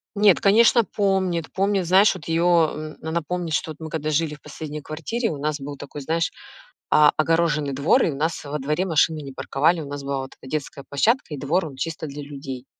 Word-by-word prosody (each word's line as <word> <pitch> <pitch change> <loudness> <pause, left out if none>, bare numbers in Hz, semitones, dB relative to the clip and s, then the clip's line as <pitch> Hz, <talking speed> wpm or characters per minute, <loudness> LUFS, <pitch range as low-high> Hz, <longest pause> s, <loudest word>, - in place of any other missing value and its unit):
Нет, 205 -3 +5
конечно, 225 +3 +5
помнит. 190 -5 0
Помнит, 195 -1 +1
знаешь, 190 +4 +5
вот 175 -6 -10
ее, 165 +1 +1
м, 160 -3 +2
она 160 +2 -2
помнит, 175 0 -3
что 160 - -1
вот 155 - -10
мы 160 - -6
когда 155 -1 -3
жили 155 0 0
в 150 - -17
последней 150 0 -7
квартире, 165 - -3
у 150 - -5
нас 150 +1 -2
был 140 +1 -7
такой, 145 +1 -8
знаешь, 165 +4 0 0.6
о 150 -1 +6
огороженный 155 -3 +1
двор 155 - +3
и - - +2
у - - -6
нас 160 +4 -2
во 145 +1 -4
дворе 150 +6 -1
машины 160 -2 +2
не 135 -2 -8
парковали. 160 +6 +1
У 145 - -7
нас 140 0 -6
была 140 0 -2
вот 130 - -8
эта 130 - -11
детская 140 -2 -4
площадка 215 - +1
и - - -8
двор, 160 +6 0
он 140 - -10
чисто 160 +3 -4
для 145 +1 -7
людей. 135 -3 -7
155 Hz, 220 wpm, -23 LUFS, 145-175 Hz, 0.6 s, о